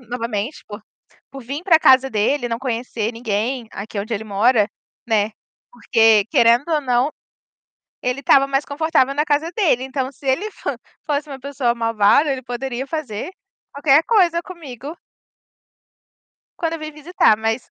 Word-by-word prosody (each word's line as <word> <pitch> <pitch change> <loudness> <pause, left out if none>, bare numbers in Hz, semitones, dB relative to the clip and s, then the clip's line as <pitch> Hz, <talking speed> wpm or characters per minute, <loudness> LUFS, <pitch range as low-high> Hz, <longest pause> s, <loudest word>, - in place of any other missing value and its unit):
novamente, 235 +1 -4
por 205 0 -9 0.5
por 270 -1 -9
vir 280 +8 -6
pra 330 -4 +5
casa 265 -1 +5
dele 245 +5 0
e - - -11
não 230 0 -2
conhecer 235 -3 -3
ninguém 230 +2 -2
aqui 205 +1 -7
onde 220 +3 -4
ele 220 +1 -3
mora, 215 +1 +2 0.4
né, 215 -1 +1 0.4
porque, 225 -4 +3
querendo 240 +1 +4
ou 305 -2 +1
não, 250 +1 +1 0.9
ele 250 +2 -1
estava 275 0 +4
mais 275 +1 0
confortável 285 -2 +1
na 295 +2 +1
casa 300 +2 0
dele, 295 - +2
então, 265 0 -3
se 275 - -15
ele 330 +12 0
fan - - -5 0.3
fosse 295 0 -1
uma 270 -1 -7
pessoa 270 -4 -1
malvada, 230 +5 +3
ele 260 -1 -5
poderia 250 +1 -4
fazer 285 - -5 0.4
qualquer 285 +1 +4
coisa 350 -6 +3
comigo 310 -3 -9 1.6
quando 330 -1 -1
eu - - -5
vim 310 0 -6
visitar, 300 -6 +2
mas 225 +3 -3
260 Hz, 155 wpm, -20 LUFS, 230-295 Hz, 1.6 s, pra